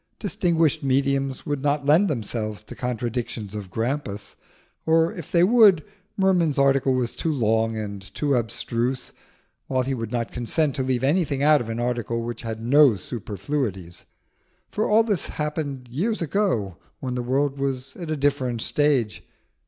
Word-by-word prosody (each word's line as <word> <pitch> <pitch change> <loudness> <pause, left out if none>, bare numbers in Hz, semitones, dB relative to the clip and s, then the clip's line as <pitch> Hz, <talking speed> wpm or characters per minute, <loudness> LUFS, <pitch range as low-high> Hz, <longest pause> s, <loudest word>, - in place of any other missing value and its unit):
Distinguished 170 -7 +1
mediums 135 -1 0
would 145 -2 -2
not 145 0 0
lend 160 +8 +5
themselves 110 - -3
to - - -10
contradictions 120 -3 -3
of 105 -3 -6
Grampus, 115 -1 -3 0.5
or 165 +1 +3
if 170 - -9
they 170 -1 +4
would, 205 -6 +6 0.3
Merman's 180 -6 +2
article 135 -1 +3
was 125 -2 -1
too 165 - -2
long 115 -4 +1
and 100 -2 -5
too 145 -2 0
abstruse, 120 +1 -2 0.5
while 130 -1 +1
he 135 +1 -2
would 115 -3 -4
not 120 -2 -2
consent 140 +5 0
to - - 0
leave 130 -1 -1
anything 145 -2 +1
out 150 0 +5
of 115 - -6
an 115 +1 -3
article 120 -1 -1
which 120 0 -5
had 110 -1 -5
no 135 0 +6
superfluities; 100 - -4 0.7
for 215 - -1
all 220 +2 +5
this 205 -6 0
happened 150 -4 -4
years 185 - -1
ago 160 - 0 0.2
when 130 -1 -4
the 125 - -2
world 135 +3 0
was 135 -1 -3
at 170 -3 -7
a 155 - -1
different 135 -5 0
stage. 140 -8 +1
135 Hz, 160 wpm, -24 LUFS, 115-150 Hz, 0.7 s, would